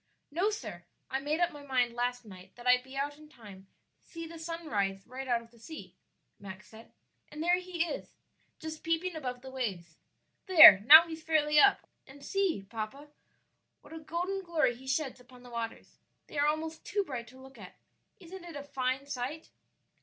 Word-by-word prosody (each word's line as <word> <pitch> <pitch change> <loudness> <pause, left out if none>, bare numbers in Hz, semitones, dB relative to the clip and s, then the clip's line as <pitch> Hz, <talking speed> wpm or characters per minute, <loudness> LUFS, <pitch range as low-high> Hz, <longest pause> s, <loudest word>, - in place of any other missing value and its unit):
"No, 360 +8 +1
sir, 210 - -7 0.3
I 265 - 0
made 295 +4 -2
up 350 0 +2
my 295 -2 -11
mind 255 -4 0
last 245 0 -2
night 185 -2 -14
that 240 - -13
I'd 250 0 +5
be 265 +1 -13
out 290 +1 -3
in 305 0 -15
time 205 -9 -14 0.3
to - - -30
see 330 -1 -7
the 330 0 -10
sun 330 +1 -6
rise 195 -6 -2
right 260 +2 -8
out 235 -2 0
of 230 - -21
the 235 - -21
sea," 315 +8 -10 0.4
Max 190 0 -11
said; 225 +1 -15 0.4
"and 300 +1 -6
there 355 +1 +3
he 360 -2 -2
is, 305 -4 -7 0.4
just 315 0 -7
peeping 330 +2 -1
above 250 -5 -5
the 265 - -9
waves. 190 -11 -5 0.5
There, 320 - +11
now 315 +3 +11
he's 320 -1 -7
fairly 300 -1 +2
up 400 +3 +5 0.3
I 265 - -13
and 280 0 -14
see, 390 - -1
papa, 230 +7 -7 0.7
what - - -15
a 325 - -7
golden 350 +5 -3
glory 325 -9 0
he 260 +2 -14
sheds 265 -1 -2
upon 250 0 -17
the 245 - -13
waters; 230 -1 -6 0.3
they 295 - -6
are 290 - +3
almost 315 +1 -3
too 405 0 -1
bright 250 -8 -6
to 260 +2 -15
look 265 +1 -14
at. - - -12 0.4
Isn't 370 0 -11
it 340 -3 -10
a 285 - -6
fine 265 -1 -2
sight?" 280 +4 -5
280 Hz, 200 wpm, -30 LUFS, 240-325 Hz, 0.7 s, There